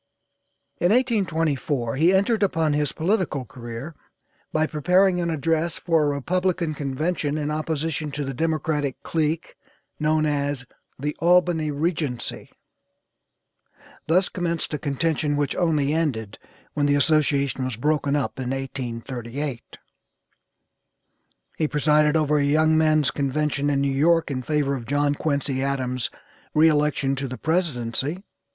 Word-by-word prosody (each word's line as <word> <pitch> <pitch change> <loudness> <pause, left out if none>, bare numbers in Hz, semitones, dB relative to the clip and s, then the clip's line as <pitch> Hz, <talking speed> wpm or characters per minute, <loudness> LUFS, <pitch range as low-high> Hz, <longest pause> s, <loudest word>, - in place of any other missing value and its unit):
In 175 - +3
1824 165 - +1
he 165 +6 +4
entered 200 +4 +2
upon 165 -6 +2
his 150 -1 0
political 170 - -1
career 120 +6 -8 0.6
by 155 0 +2
preparing 180 +4 +2
an 170 -1 -1
address 165 +1 0
for 165 -2 +2
a - - +2
Republican 175 +2 0
convention 150 +2 -2
in 150 0 -2
opposition 155 0 -2
to 145 0 -3
the 135 - -4
Democratic 155 -1 -1
clique 160 0 -1 0.4
known 155 0 +2
as 145 -3 -1 0.3
the 150 +3 -3
'Albany 175 -2 +3
Regency,' 150 -4 -2 1.6
thus 180 +4 +3
commenced 170 -3 -2
a 150 - -1
contention 145 0 0
which 145 -2 0
only 155 -5 +1
ended 115 -11 -2 0.3
when 145 -1 +1
the 145 - +3
association 140 -2 +2
was 130 -2 -2
broken 145 +2 +1
up 140 -2 -2
in 125 -1 -3
1838. 130 0 -5 1.8
He 155 - +2
presided 150 +1 +3
over 150 -1 +2
a - - +2
young 155 +2 +3
men's 155 -2 +3
convention 145 0 0
in 140 -1 +1
New 140 -1 +1
York 165 +3 +3
in 130 -2 -2
favor 145 0 0
of 120 -4 -5
John 145 +1 +2
Quincy 140 -3 -1
Adams' 130 -3 -1 0.5
re 155 +1 +6
election 145 -2 +1
to 135 +1 -3
the 130 0 -6
presidency. 155 - -1
150 Hz, 130 wpm, -24 LUFS, 140-160 Hz, 1.8 s, re